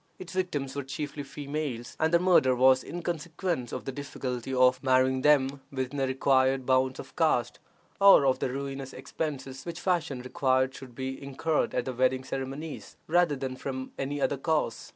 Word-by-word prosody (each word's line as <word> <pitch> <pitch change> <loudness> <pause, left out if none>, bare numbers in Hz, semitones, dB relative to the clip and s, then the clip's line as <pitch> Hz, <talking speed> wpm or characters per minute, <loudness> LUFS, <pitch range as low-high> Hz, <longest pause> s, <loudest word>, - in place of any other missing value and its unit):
Its 185 +1 -9
victims 150 -8 -2
were 140 - -1
chiefly 145 +2 -5
females, 140 -3 -5
and 160 0 +2
their 170 - +5
murder 170 -8 +4
was 130 +1 +5
in 175 0 -6
consequence 170 -5 -3
of 130 - -5
the 135 - -3
difficulty 130 -2 -5
of 130 0 +4
marrying 130 0 +3
them 140 -1 +3
within 130 +1 -3
the 135 -1 +1
required 130 0 +2
bounds 130 0 +2
of 130 - -10
caste, 125 -7 +1 0.4
or 195 -8 +8
of 130 -1 +2
the - - -1
ruinous 135 0 -5
expenses 135 -1 -5
which 170 0 -6
fashion 165 -7 0
required 130 0 +1
should 130 -2 -11
be 130 +1 -5
incurred 140 +3 -1
at 125 - 0
the 130 - -3
wedding 130 +1 +1
ceremonies, 135 +4 -6
rather 170 -2 +3
than 130 -1 -4
from 130 0 -5
any 140 +2 -2
other 140 - +1
cause. 150 -5 -1
135 Hz, 175 wpm, -28 LUFS, 130-150 Hz, 0.4 s, or